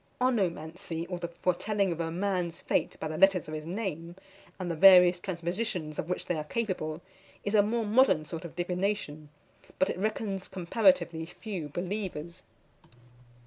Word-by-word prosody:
Onomancy, 175 -8 -1
or 180 - -3
the 170 - -3
foretelling 185 +3 0
a 165 - -2
man's 180 -1 -2
fate - - -1
by 160 - -3
the 155 0 -4
letters 195 -4 +4
of 155 - -7
his 155 0 -5
name, 175 -3 -4 0.4
and 180 -2 -2
the - - -2
various 180 0 +8
transpositions 175 -2 -3
of 165 - -3
which 180 - -2
they - - -1
are - - -3
capable, 175 -4 -3 0.4
is 205 - -2
a 210 - +7
more 225 +2 0
modern 210 -8 +4
sort 160 +2 -6
of 170 - -9
divination; 175 -4 -2 0.5
but 190 - +2
it - - -6
reckons 205 -2 -2
comparatively 180 -3 +2
few 180 -4 -6
believers. 175 -1 -4
180 Hz, 155 wpm, -29 LUFS, 165-200 Hz, 0.5 s, various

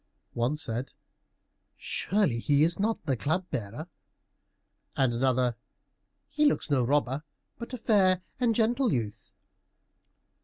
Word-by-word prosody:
One 120 +5 0
said, 125 -4 -3 0.8
"Surely 190 - 0
he 145 +4 +3
is 170 +2 +2
not 220 -3 -1
the 135 -4 +1
Club 160 +9 -1
bearer," 120 +5 -5 1.1
and 130 -3 +2
another, 125 -1 +1 0.7
"He 300 - -1
looks 220 - 0
no 130 -3 +3
robber, 140 +1 +1 0.4
but 235 - -7
a 255 - -4
fair 190 -5 +3 0.2
and 235 -3 +2
gentle 240 +2 +2
youth." 110 -4 -3
150 Hz, 120 wpm, -28 LUFS, 125-205 Hz, 1.1 s, he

